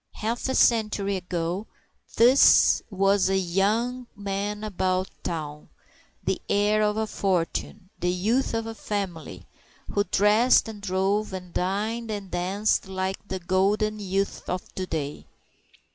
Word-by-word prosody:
Half 230 +4 -3
a 260 - 0
century 210 -4 +2
ago 180 +2 -3 0.5
this 250 +4 +6
was 195 -1 +2
a 195 - +2
young 215 +7 0
man 205 +1 -3
about 185 -2 -1
town, 150 -3 -5 0.5
the - - -1
heir 210 +1 +2
of 210 0 +1
a 220 - +1
fortune, 190 0 -2
a 175 - 0
youth 215 +9 +1
of 225 0 -3
"family" 170 - -4 0.5
who 205 - +2
dressed 210 +7 +4
and 215 -2 -8
drove 195 +2 0
and 180 -2 -7
dined 215 +5 -2
and 200 -3 -5
danced 190 +4 0
like 190 +1 -4
the 190 - -3
golden 200 +4 +1
youth 195 0 -2
of 180 0 -4
to 185 -1 -4
day. 150 -3 -4
195 Hz, 130 wpm, -25 LUFS, 185-215 Hz, 0.5 s, this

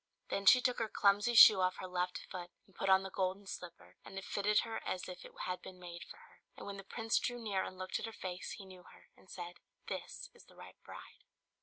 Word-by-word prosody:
Then 195 0 -1
she 250 - +9
took 250 -1 +1
her 225 -1 -1
clumsy 205 +4 +3
shoe 210 -3 +10
off 185 0 +2
her - - -6
left 180 0 -2
foot 180 -1 -6 0.2
and 195 - -25
put 195 - -1
on 190 0 +6
the 190 - -6
golden 190 +1 -1
slipper; 180 -2 -9
and 195 - -10
it 195 - -5
fitted 210 +1 +2
her 225 -1 -4
as 185 - -3
if 180 -1 -8
it - - -11
had 180 0 -3
been 185 -1 -11
made 175 0 -8
for - - -12
her. 475 0 -20 0.2
And - - -8
when 200 0 -6
the 195 - -8
Prince 225 +3 0
drew 245 0 -2
near 205 -5 -1
and 185 - -7
looked 185 0 -3
at - - -4
her - - -6
face 185 -4 -6
he 195 - -10
knew 185 -1 -12
her, - - -18
and 190 - -21
said, 175 -1 -7 0.3
"This - - -6
is - - -18
the - - -20
right - - -13
bride." - - -12
190 Hz, 255 wpm, -35 LUFS, 185-210 Hz, 0.3 s, shoe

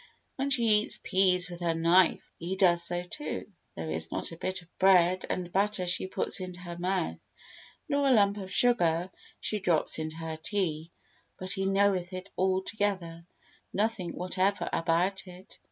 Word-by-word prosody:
When 275 +1 -2
she 265 -4 +3 0.2
eats - - +1
peas 185 -1 +3
with 175 -1 -9
her 170 -2 0
knife, 170 +2 +3
he 175 +3 -3
does 175 -3 +4
so 175 +1 +1
too; 295 +12 -5 0.3
there 80 -1 -5
is 80 +1 -4
not - - -3
a - - -7
bit 185 +2 -4
of 175 - -28
bread 185 -1 +4
and 180 -1 -3
butter 200 0 0
she 180 +1 +1
puts 190 - +1
into 180 -1 -7
her 175 -1 -7
mouth, 180 0 -2 0.6
nor 285 -2 +1
a - - +4
lump 205 -4 +4
of 190 -2 -7
sugar 180 -7 +2 0.3
she 210 - -2
drops 175 -4 +1
into 155 0 -4
her 160 -1 -5
tea, 165 -3 -2 0.5
but 185 +1 -1
he 195 -1 -1
knoweth 195 -2 +1
it 185 +2 -7
altogether, 190 +2 0
though 170 - -8
he - - -10
knows 170 +1 -16 0.5
nothing 205 -4 -1
whatever 185 +1 0
about 180 +4 0
it. 180 +1 -14
185 Hz, 180 wpm, -29 LUFS, 170-195 Hz, 0.6 s, does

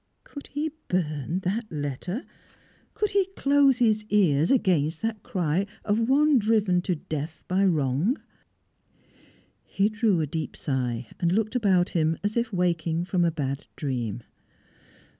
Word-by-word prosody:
Could 285 - -10
he 300 +2 -3 0.2
burn 165 -1 -1
that 215 +4 -2
letter? 150 - -4 0.7
Could 420 -2 0
he 390 -1 +2
close 280 -2 +4
his 220 -3 +2
ears 165 -7 +3
against 170 - +2
that 220 -2 -2
cry 180 +2 -1 0.2
of 225 +3 +1
one 290 0 +5
driven 210 -5 +2
to 180 0 -1
death 155 0 -6
by 185 +2 +2
wrong? 160 - +1 1.4
He 200 +2 +1
drew 215 -4 +1
a 155 - +1
deep 155 +2 -5
sigh, 125 -4 -2
and 170 -1 +1
looked 215 +4 0
about 190 -7 +3
him 160 -1 +1
as 205 +1 -1
if 235 0 0
waking 170 -2 0
from 180 -1 +1
a 170 - +3
bad 140 -3 -4
dream. 120 -6 -3
180 Hz, 140 wpm, -26 LUFS, 155-220 Hz, 1.4 s, one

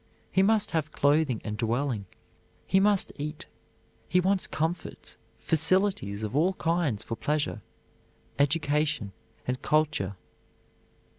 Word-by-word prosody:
He 190 - +3
must 210 +2 +3
have 155 -2 -1
clothing 145 -5 +2
and 105 -1 -3
dwelling; 115 -1 -1 0.6
he 190 - +3
must 200 -1 +3
eat. 150 +1 -5 0.6
He 180 - +4
wants 190 +1 +2
comforts, 165 +3 -4 0.2
facilities 160 - +1
of 110 +3 -3
all 170 +6 +3
kinds 165 - 0
for 115 - -4
pleasure, 145 -4 -1 0.8
education, 145 -5 +1 0.3
and 125 0 -2
culture. 150 -11 +1
150 Hz, 115 wpm, -28 LUFS, 125-175 Hz, 0.8 s, He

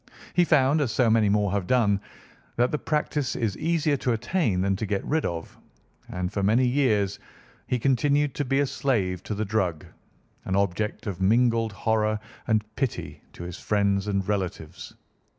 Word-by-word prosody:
He 175 - +4
found, 145 -1 +3
as 130 -6 0
so 115 0 +3
many 110 -2 +4
more 100 -1 +2
have 100 -3 -1
done, 105 -6 +2 0.5
that 120 +1 +2
the 150 - -1
practice 150 -3 -1
is 110 -5 -1
easier 160 -3 +1
to 125 -2 0
attain 120 - 0
than 95 0 +1
to 110 - -3
get 100 0 -2
rid 160 +1 0
of, 85 -1 -6 0.5
and 90 +1 -3
for 100 - -1
many 110 +6 +3
years 110 -7 +1 0.5
he 125 - +1
continued 140 +3 +2
to 145 - -2
be 135 +1 +1
a - - +2
slave 100 -10 -1
to 105 - -4
the 110 +2 -2
drug, 95 -7 -1 0.6
an 95 - -1
object 100 +3 -1
of 95 -3 -4
mingled 115 +2 +3
horror 110 0 0 0.3
and 110 -2 +2
pity 135 -5 -3
to - - -9
his 85 0 -7
friends 100 -1 +1
and 100 -2 -1
relatives. 95 -6 -4
110 Hz, 175 wpm, -26 LUFS, 100-130 Hz, 0.6 s, He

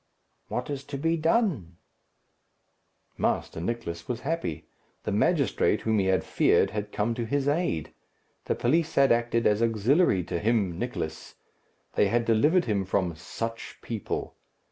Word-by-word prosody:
"What 125 +4 -3
is 140 -1 -4
to 140 -1 -5
be 165 +4 +1
done?" 160 - 0 1.4
Master 80 - -1
Nicless 85 -5 -4
was 120 -1 -3
happy. 150 - -3 0.4
The - - -2
magistrate, - - +2
whom 110 -1 +1
he 95 - +1
had 95 -1 +2
feared, - - +3
had 105 0 -4
come 110 +3 0
to 120 0 -3
his 140 +4 -1
aid. 145 - 0 0.5
The - - 0
police 160 +6 +1
had 135 -1 +5
acted 115 0 +2
as 105 +1 +3
auxiliary 115 - +3
to 85 - -3
him, 100 -4 +1
Nicless. 115 -10 -5 0.6
They 105 - +3
had 115 +3 +1
delivered 150 +11 +3
him 100 -4 0
from 90 -3 -1
"such 115 +7 -6
people." 110 -4 -4
115 Hz, 145 wpm, -27 LUFS, 100-140 Hz, 1.4 s, had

